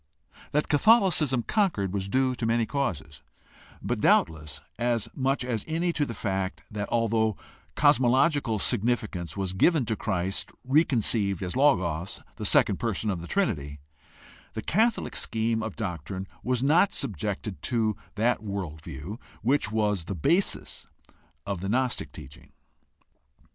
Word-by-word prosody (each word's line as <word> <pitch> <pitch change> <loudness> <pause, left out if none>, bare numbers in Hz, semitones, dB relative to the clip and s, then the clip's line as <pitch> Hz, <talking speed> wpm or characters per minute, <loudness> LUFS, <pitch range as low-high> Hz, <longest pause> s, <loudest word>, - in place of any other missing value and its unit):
That 150 +1 +1
Catholicism 160 - +4
conquered 140 - 0
was 100 -1 -2
due 130 +3 +2
to 120 -2 -4
many 115 0 +2
causes, 95 - -3 0.6
but - - -1
doubtless 75 -2 +2 0.2
as 120 -2 +1
much 135 -1 0
as 115 -4 -2
any 170 +2 0
to 145 -3 0
the 115 - -6
fact 95 -2 -2
that, 105 -1 -4
although 110 -2 +1 0.4
cosmological 130 -2 +3
sig 100 - 0
nificance 105 -7 -2
was 95 -2 -2
given 150 - +3
to 110 - -1
Christ 95 -3 -2 0.2
reconceived 115 - +3
as 90 - -4
Logos, 95 - +1 0.2
the - - -2
second - - +4
person 110 - -1
of 90 -3 -4
the 85 - -8
Trinity, 75 - -1 0.7
the - - -5
Catholic 225 +5 +1
scheme 110 0 0
of 110 -2 -5
doctrine 95 -1 -5
was 125 0 0
not 170 +8 +4
subjected 100 - -2
to 110 -4 0 0.2
that 115 +1 +1
world 95 -7 -5
view 80 - -7 0.2
which 130 -2 +2
was 105 -5 0
the 100 - -4
basis 170 - +1 0.6
of 100 -4 -3
the 95 - -3
gnostic 125 +3 0
teaching. 70 -2 -12
110 Hz, 140 wpm, -27 LUFS, 95-130 Hz, 0.7 s, Catholicism